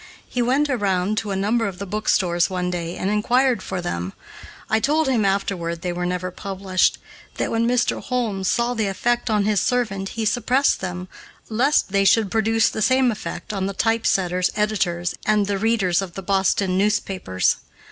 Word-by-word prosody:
He 245 - -2
went 265 +5 +2
around 205 -5 0
to 215 - -6
a 195 - -1
number 220 +4 +1
of 190 -2 -6
the 200 - -5
bookstores 185 -4 +1
one 180 -1 -2
day 170 -1 -4
and 195 - -1
inquired 245 +4 +2
for 180 - -4
them. 90 - -4 0.5
I 220 - +2
told 300 +5 +1
him 245 -5 +2
afterward 190 -4 -1
they 180 -1 -2
were 175 0 -2
never 180 0 -3
published; 190 -1 0 0.4
that - - -1
when 230 0 +1
Mr. 245 0 +1
Holmes 220 -7 -2
saw 235 +3 +1
the 220 -4 -1
effect 240 +5 0
on 210 -2 +2
his 210 -3 +2
servant 210 -6 -1
he 225 - -1
suppressed 250 +5 +2
them, 180 0 -5 0.4
lest 240 0 +2
they 200 0 +3
should 195 +1 +3
produce 225 0 +2
the 215 - -4
same 260 +2 +3
effect 215 0 -6
on 195 -1 -1
the 200 - -3
typesetters, 190 -5 +1
editors, 180 -5 0
and 210 -1 +3
the 200 -1 -2
readers 200 -5 +2
of 185 -3 -7
the 195 - -6
Boston 190 0 +1
newspapers. 195 - 0
200 Hz, 180 wpm, -22 LUFS, 185-225 Hz, 0.5 s, they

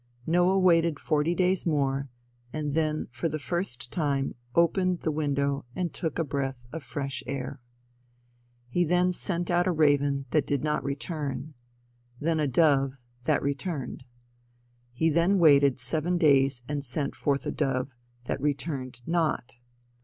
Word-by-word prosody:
Noah 175 +3 +3
waited 170 -4 +4
forty 155 +2 +1
days 185 0 +2
more, 140 -3 0 0.4
and 150 -2 -3
then 155 -1 0
for 130 +6 -2
the 155 - -2
first 150 -7 -3
time 140 -4 0 0.2
opened 180 +1 +2
the 160 - 0
window 140 -2 -1
and 180 -2 -2
took 160 -4 -3
a 165 - +1
breath 135 -4 -3
of 165 - -4
fresh 135 +1 -3
air. 130 -1 -4 1.1
He 175 +8 +1
then 180 +2 +2
sent 175 -1 -1
out 175 +1 +2
a - - +3
raven 145 -3 +2
that 155 - +2
did 140 -2 0
not 150 -1 0
return, 145 +1 -4 0.7
then 160 +1 0
a 150 - +1
dove 135 -1 +3 0.3
that - - +2
returned. 140 -2 -3 0.9
He 160 +7 +1
then 170 +5 +3
waited 140 -6 +5
seven 155 +8 0
days 135 -6 +4
and 145 -1 -3
sent 140 +2 -2
forth 140 -2 -1
a - - -1
dove 130 -3 -1 0.3
that 125 - -3
returned 135 -4 -3
not. 160 -8 -1
150 Hz, 145 wpm, -27 LUFS, 135-165 Hz, 1.1 s, waited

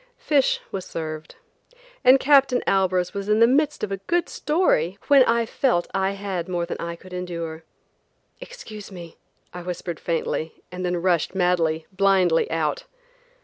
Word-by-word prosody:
Fish 285 -4 +2
was 190 - -4
served, 155 -1 -6 0.7
and 260 +1 +7
Captain 270 -3 +4
Albers 185 -2 +1
was 200 0 -5
in 210 +1 +3
the 230 - +7
midst 285 +3 +1
of 205 - -2
a 195 - -2
good 345 0 +1
story 250 - +1
when 280 -2 +7
I 230 0 +2
felt 235 -7 0
I 195 0 0
had 195 -3 -4
more 175 -1 -1
than 170 - -5
I 170 0 -4
could 185 +2 -14
endure. 170 -3 -5 0.8
"Excuse 215 - -10
me," 170 -3 -10 0.4
I 180 - -7
whispered 175 -2 -5
faintly, 165 -1 -3
and 180 0 -6
then 180 0 0
rushed, 180 0 +1
madly, 170 -3 +1
blindly 190 -3 +2
out. 160 -2 -1
185 Hz, 155 wpm, -23 LUFS, 170-225 Hz, 0.8 s, and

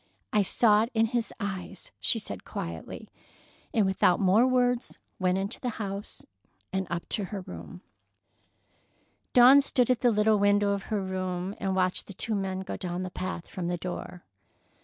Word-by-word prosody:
"I 210 - +5
saw 210 +2 +4
it 230 - -1
in 225 0 +4
his 235 0 -1
eyes," 195 -3 -5
she - - +2
said - - -6
quietly, 85 -1 -6 0.6
and 215 -3 +2
without 190 -1 +3
more 205 +6 +4
words 245 -1 +1 0.2
went 185 0 +2
into 195 +4 -3
the 250 - -2
house 200 -1 -6 0.5
and 190 -1 -1
up 175 -1 -3
to 205 - 0
her 195 +1 -5
room. 85 - -9 1.5
Dawn 255 +3 +8
stood 255 -3 +2
at 250 - +2
the 245 - +5
little 210 -1 +3
window 205 0 +3
of 200 -1 -2
her 210 -3 0
room 185 0 -3
and 190 -1 -1
watched 185 -1 0
the 200 - -8
two 220 - -2
men 190 -2 -2
go 190 - -5
down 180 -1 -3
the 185 - -5
path 180 -2 -4
from 180 -2 -5
the 175 0 -1
door. 180 0 -6
195 Hz, 175 wpm, -28 LUFS, 185-220 Hz, 1.5 s, Dawn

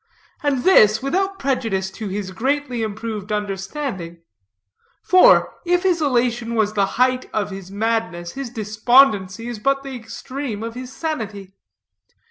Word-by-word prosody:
And 280 -4 0
this, 220 - +5
without 385 +7 0
prejudice 225 - -1
to 210 +2 -6
his 195 -1 -4
greatly 260 +3 -1
improved 215 -1 -4
understanding; 195 - -4 0.8
for, 370 +7 +6
if 355 0 +1
his 355 -3 +2
elation 240 -4 0
was 215 -1 +1
the 200 -2 +2
height 255 +1 +2
of 205 -2 -2
his 190 -1 -8
madness, 200 -5 -2
his 275 -2 -6
despondency 220 -1 +2
is 240 -3 -5
but 275 +4 +1
the 270 -1 -6
extreme 240 0 -6
of 230 0 -5
his 255 +1 -8
sanity. 215 - -5
230 Hz, 135 wpm, -21 LUFS, 205-275 Hz, 0.8 s, for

